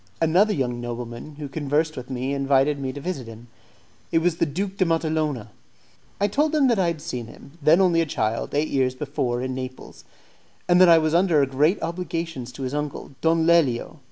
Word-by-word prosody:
Another 180 Hz, +7 st, +3 dB
young 125 Hz, -8 st, -2 dB
nobleman, 120 Hz, +4 st, -6 dB
who 145 Hz, -1 st, -6 dB
conversed 150 Hz, +2 st, -1 dB
with 125 Hz, -1 st, -8 dB
me, 130 Hz, +1 st, -2 dB
invited 140 Hz, +1 st, +2 dB
me 135 Hz, -1 st, -3 dB
to 145 Hz, -, -8 dB
visit 140 Hz, -6 st, -4 dB
him. 115 Hz, +1 st, -12 dB, 0.6 s
It -, -, +2 dB
was 165 Hz, 0 st, +1 dB
the 170 Hz, -, +1 dB
Duke 190 Hz, +6 st, -4 dB
de 190 Hz, -, +3 dB
Matalona. 155 Hz, -, -1 dB, 0.7 s
I 200 Hz, -, +2 dB
told 295 Hz, +9 st, +1 dB
him 285 Hz, -3 st, +4 dB
that 230 Hz, -4 st, +2 dB
I 180 Hz, -, +2 dB
had 165 Hz, -3 st, -3 dB
seen 120 Hz, -6 st, -5 dB
him, 140 Hz, -, -14 dB
then 155 Hz, +5 st, +5 dB
only 175 Hz, -3 st, +4 dB
a 165 Hz, -, -1 dB
child, 110 Hz, -1 st, -2 dB
eight 150 Hz, +2 st, +1 dB
years 130 Hz, -2 st, +1 dB
before 130 Hz, -3 st, -2 dB
in 130 Hz, 0 st, -3 dB
Naples, 130 Hz, 0 st, -8 dB, 0.6 s
and 180 Hz, 0 st, +5 dB
that 185 Hz, -, +8 dB
I 165 Hz, -, +8 dB
was 155 Hz, -1 st, +1 dB
under 170 Hz, -5 st, +4 dB
great 145 Hz, +8 st, +1 dB
obligations 165 Hz, -7 st, -4 dB
to 135 Hz, -, -7 dB
his 130 Hz, +1 st, -3 dB
uncle, 150 Hz, -1 st, -4 dB
Don 165 Hz, 0 st, +2 dB
Lelio. 160 Hz, -8 st, +2 dB
150 Hz, 200 wpm, -24 LUFS, 130-170 Hz, 0.7 s, that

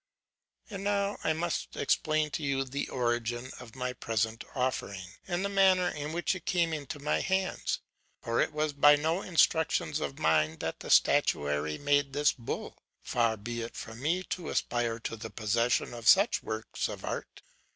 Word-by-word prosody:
And 195 Hz, -1 st, -5 dB
now 200 Hz, 0 st, 0 dB
I 160 Hz, -, +2 dB
must 170 Hz, +2 st, -3 dB
explain 155 Hz, -1 st, +1 dB
to -, -, -3 dB
you 140 Hz, -2 st, 0 dB
the 135 Hz, +2 st, -4 dB
origin 120 Hz, 0 st, -1 dB
of 125 Hz, -2 st, -12 dB
my 125 Hz, -1 st, -3 dB
present 115 Hz, -1 st, -2 dB
offering, 125 Hz, -7 st, -2 dB, 0.2 s
and 180 Hz, +1 st, -1 dB
the -, -, +2 dB
manner 190 Hz, -2 st, +4 dB
in 150 Hz, -1 st, -5 dB
which 175 Hz, +3 st, 0 dB
it 185 Hz, -, -8 dB
came 170 Hz, -3 st, +2 dB
into 145 Hz, -2 st, -5 dB
my 145 Hz, +1 st, 0 dB
hands. 190 Hz, 0 st, -1 dB, 0.4 s
For 115 Hz, 0 st, +1 dB
it -, -, +1 dB
was 150 Hz, 0 st, -1 dB
by 145 Hz, +1 st, +7 dB
no 160 Hz, +5 st, 0 dB
instructions 160 Hz, -4 st, +2 dB
of 140 Hz, -, -4 dB
mine 80 Hz, 0 st, +2 dB
that -, -, -4 dB
the -, -, -8 dB
statuary 75 Hz, +1 st, +3 dB
made 145 Hz, -1 st, +1 dB
this 145 Hz, +1 st, +3 dB
bull: 120 Hz, -3 st, -6 dB, 0.2 s
far 115 Hz, -2 st, +1 dB
be 120 Hz, +3 st, -5 dB
it 115 Hz, -, -6 dB
from 115 Hz, +2 st, -8 dB
me 170 Hz, +6 st, +1 dB
to 180 Hz, -2 st, -5 dB
aspire 120 Hz, -1 st, 0 dB
to 115 Hz, -, -4 dB
the 110 Hz, -, -7 dB
possession 115 Hz, +3 st, 0 dB
of 115 Hz, -1 st, -6 dB
such 200 Hz, +5 st, +6 dB
works 110 Hz, -1 st, -3 dB
of -, -, -7 dB
art! -, -, -5 dB
140 Hz, 175 wpm, -30 LUFS, 115-165 Hz, 0.4 s, by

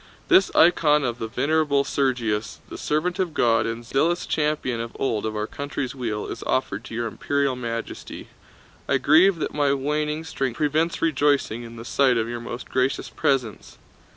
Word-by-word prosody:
This 370 Hz, +1 st, +6 dB
icon 150 Hz, -3 st, +5 dB
of 120 Hz, -1 st, -2 dB
the 115 Hz, -, -3 dB
Venerable 140 Hz, +3 st, +1 dB
Sergius, 115 Hz, -7 st, -1 dB
the -, -, -7 dB
servant 175 Hz, +5 st, -1 dB
of 180 Hz, -4 st, -1 dB
God 115 Hz, -1 st, +3 dB
and 115 Hz, +1 st, -5 dB
zealous 165 Hz, +8 st, +1 dB
champion 150 Hz, -6 st, -1 dB
of 115 Hz, 0 st, -7 dB
old 110 Hz, -5 st, -1 dB
of 110 Hz, -, -4 dB
our 105 Hz, 0 st, -1 dB
country's 140 Hz, +1 st, -4 dB
weal, 115 Hz, -6 st, -3 dB
is 115 Hz, -, -6 dB
offered 110 Hz, -5 st, -1 dB
to -, -, -8 dB
Your 120 Hz, 0 st, -1 dB
Imperial 140 Hz, +3 st, -1 dB
Majesty. 115 Hz, -2 st, -6 dB, 0.6 s
I 140 Hz, -, +4 dB
grieve 160 Hz, +8 st, +5 dB
that 160 Hz, -, -4 dB
my 145 Hz, -2 st, +2 dB
waning 150 Hz, +3 st, -1 dB
strength 135 Hz, -6 st, -3 dB
prevents 155 Hz, +3 st, 0 dB
rejoicing 145 Hz, -6 st, +1 dB
in 115 Hz, -1 st, -10 dB
the 115 Hz, 0 st, -9 dB
sight 130 Hz, -1 st, +3 dB
of 115 Hz, 0 st, 0 dB
your 120 Hz, 0 st, -5 dB
most 120 Hz, +1 st, -7 dB
gracious 130 Hz, +1 st, -1 dB
presence. 125 Hz, -6 st, -1 dB
135 Hz, 175 wpm, -24 LUFS, 115-150 Hz, 0.6 s, This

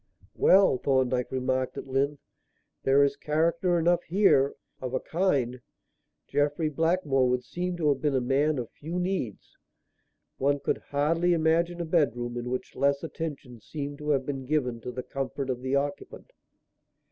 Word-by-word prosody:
"Well," 190 Hz, -9 st, +5 dB
Thorndyke 130 Hz, -2 st, +1 dB
remarked 130 Hz, 0 st, -1 dB
at -, -, -5 dB
length, 140 Hz, +2 st, -1 dB, 0.6 s
"there 135 Hz, +1 st, +4 dB
is 140 Hz, 0 st, +2 dB
character 165 Hz, +4 st, +1 dB
enough 170 Hz, +1 st, +3 dB
here 165 Hz, -7 st, +3 dB, 0.3 s
of 130 Hz, 0 st, -3 dB
a -, -, +1 dB
kind. 135 Hz, -9 st, 0 dB, 0.7 s
Jeffrey 145 Hz, +2 st, +1 dB
Blackmore 150 Hz, -5 st, +1 dB
would 125 Hz, 0 st, 0 dB
seem 180 Hz, +3 st, -3 dB
to 160 Hz, -3 st, 0 dB
have 140 Hz, -2 st, +1 dB
been 150 Hz, -3 st, +1 dB
a -, -, +3 dB
man 140 Hz, +4 st, +1 dB
of 120 Hz, -2 st, -4 dB
few 165 Hz, +4 st, -6 dB
needs. 180 Hz, -, -3 dB, 0.8 s
One 140 Hz, +1 st, +2 dB
could -, -, -1 dB
hardly 165 Hz, +5 st, +2 dB
imagine 170 Hz, +1 st, +1 dB
a -, -, -2 dB
bedroom 120 Hz, -8 st, 0 dB
in 120 Hz, 0 st, -4 dB
which 130 Hz, 0 st, -4 dB
less 140 Hz, +1 st, +1 dB
attention 145 Hz, -8 st, -6 dB
seemed 145 Hz, +1 st, -6 dB
to 150 Hz, 0 st, -5 dB
have 135 Hz, -3 st, +2 dB
been 135 Hz, -2 st, -4 dB
given 125 Hz, -6 st, 0 dB
to 125 Hz, -, -5 dB
the 125 Hz, +1 st, -5 dB
comfort 135 Hz, 0 st, -3 dB
of 125 Hz, -1 st, -4 dB
the 130 Hz, +1 st, -1 dB
occupant." 145 Hz, -, -3 dB
140 Hz, 160 wpm, -27 LUFS, 130-165 Hz, 0.8 s, Well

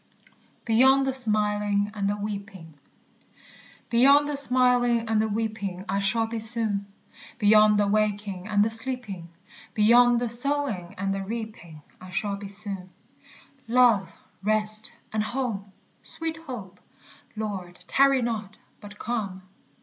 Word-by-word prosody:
BEYOND 265 Hz, +4 st, +4 dB
THE 265 Hz, -, -1 dB
SMILING 210 Hz, -4 st, 0 dB
AND 200 Hz, -2 st, -1 dB
THE 205 Hz, -, -1 dB
WEEPING. 200 Hz, -5 st, -7 dB, 1.2 s
Beyond 280 Hz, +5 st, +5 dB
the 295 Hz, -, -2 dB
smiling 250 Hz, -3 st, +3 dB
and 220 Hz, -1 st, +2 dB
the 220 Hz, -, 0 dB
weeping 210 Hz, -4 st, -4 dB
I 200 Hz, -, -1 dB
shall 210 Hz, +3 st, +1 dB
be 225 Hz, 0 st, -5 dB
soon; 220 Hz, -3 st, -1 dB, 0.5 s
Beyond 210 Hz, 0 st, +5 dB
the 205 Hz, -, +3 dB
waking 205 Hz, -2 st, -1 dB
and 205 Hz, -1 st, +2 dB
the 225 Hz, -, 0 dB
sleeping, 225 Hz, -7 st, -1 dB, 0.5 s
Beyond 240 Hz, +3 st, +5 dB
the 245 Hz, -, -1 dB
sowing 240 Hz, -6 st, 0 dB
and 195 Hz, +1 st, -1 dB
the 195 Hz, -, -3 dB
reaping, 200 Hz, -8 st, -7 dB, 0.2 s
I 185 Hz, -, -11 dB
shall 200 Hz, +2 st, -2 dB
be 200 Hz, 0 st, -8 dB
soon. 195 Hz, -2 st, -7 dB, 0.8 s
_Love, 235 Hz, -6 st, +4 dB, 0.3 s
rest, 215 Hz, +1 st, +2 dB, 0.2 s
and 215 Hz, -, 0 dB
home! 215 Hz, -4 st, -3 dB, 0.3 s
Sweet 325 Hz, -1 st, -5 dB
hope! 205 Hz, -8 st, -8 dB, 0.6 s
Lord, 195 Hz, -5 st, -5 dB
tarry 275 Hz, -2 st, +3 dB
not, 215 Hz, -3 st, -4 dB, 0.2 s
but 205 Hz, 0 st, -12 dB
come. 205 Hz, -6 st, -4 dB
215 Hz, 130 wpm, -25 LUFS, 200-240 Hz, 1.2 s, Beyond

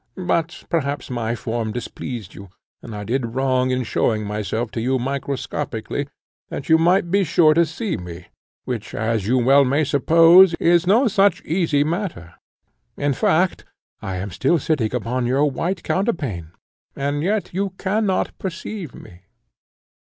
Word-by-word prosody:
But 170 Hz, -2 st, -1 dB
perhaps 145 Hz, -4 st, -2 dB
my 120 Hz, -1 st, -2 dB
form 115 Hz, -2 st, -3 dB
displeased 120 Hz, -3 st, -6 dB
you, 100 Hz, -1 st, -11 dB, 0.3 s
and 115 Hz, -3 st, -8 dB
I 105 Hz, -, -5 dB
did 120 Hz, +1 st, -2 dB
wrong 130 Hz, -1 st, +1 dB
in 130 Hz, 0 st, 0 dB
showing 110 Hz, -1 st, 0 dB
myself 105 Hz, +2 st, -3 dB
to 115 Hz, -, -3 dB
you 130 Hz, +3 st, +1 dB
microscopically, 140 Hz, 0 st, -3 dB, 0.4 s
that 140 Hz, -, -6 dB
you 160 Hz, 0 st, +6 dB
might 175 Hz, +1 st, +2 dB
be 200 Hz, +1 st, +3 dB
sure 155 Hz, -2 st, +4 dB
to 170 Hz, +1 st, +3 dB
see 175 Hz, +4 st, -3 dB
me, 85 Hz, 0 st, -9 dB, 0.4 s
which, 110 Hz, -5 st, -5 dB
as 110 Hz, -2 st, -1 dB
you 125 Hz, +2 st, +2 dB
may 135 Hz, +4 st, +5 dB
well 140 Hz, +4 st, +1 dB
suppose, 165 Hz, +6 st, +6 dB
is 170 Hz, +1 st, +2 dB
no 235 Hz, +7 st, +4 dB
such 200 Hz, -3 st, +2 dB
easy 160 Hz, -4 st, +1 dB
matter; 160 Hz, -, -4 dB, 0.6 s
in 145 Hz, 0 st, 0 dB
fact, 175 Hz, +7 st, +1 dB, 0.4 s
I 95 Hz, -, -4 dB
am 95 Hz, +2 st, -5 dB
still 135 Hz, -, +1 dB
sitting 135 Hz, -7 st, 0 dB
upon 125 Hz, +1 st, -1 dB
your 135 Hz, +4 st, +2 dB
white 170 Hz, +5 st, -2 dB
counterpane, 140 Hz, -, -2 dB, 0.5 s
and 145 Hz, +1 st, -2 dB
yet 200 Hz, +4 st, -1 dB
you 195 Hz, +2 st, -1 dB
cannot 195 Hz, 0 st, 0 dB
perceive 185 Hz, -, -6 dB
me. 90 Hz, +1 st, -14 dB
140 Hz, 150 wpm, -21 LUFS, 115-170 Hz, 0.6 s, you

